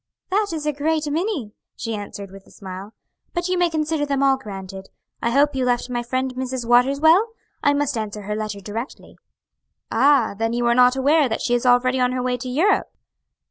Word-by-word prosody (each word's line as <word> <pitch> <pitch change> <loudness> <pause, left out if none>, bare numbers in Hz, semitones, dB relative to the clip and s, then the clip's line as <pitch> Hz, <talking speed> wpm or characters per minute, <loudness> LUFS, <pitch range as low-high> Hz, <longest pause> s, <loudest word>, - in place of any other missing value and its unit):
"That 415 +2 +2
is 310 -2 -4
a 300 - 0
great 305 +2 -1
many," 315 - -2 0.2
she 225 - -4
answered 205 -2 -7
with 195 0 -14
a - - -18
smile, 195 +2 -9 0.4
"but 345 +1 -1
you 365 - +1
may 355 -1 +2
consider 310 -1 -1
them 280 -1 0
all 270 -1 +5
granted. 195 -5 -9 0.3
I 235 - +1
hope 285 +4 +3
you 265 -1 -1
left 245 0 0
my 240 -1 -1
friend 255 +2 -2
Mrs. 255 -1 -4
Waters 250 +4 +4
well? 360 +9 +4 0.3
I 285 0 +3
must 290 -1 0
answer 215 -2 -4
her 210 +1 -3
letter 215 -2 -4
directly." 225 +7 -7 0.7
"Ah, 260 -2 +4
then 225 +2 -1
you 240 0 0
are 235 - +4
not 250 +1 +5
aware 285 +1 +3
that 225 - -2
she 240 - 0
is 245 +1 +1
already 255 +1 +3
on 250 0 +2
her 255 -1 -2
way 250 0 0
to 250 +1 -6
Europe?" 325 +11 +1
255 Hz, 210 wpm, -22 LUFS, 225-290 Hz, 0.7 s, all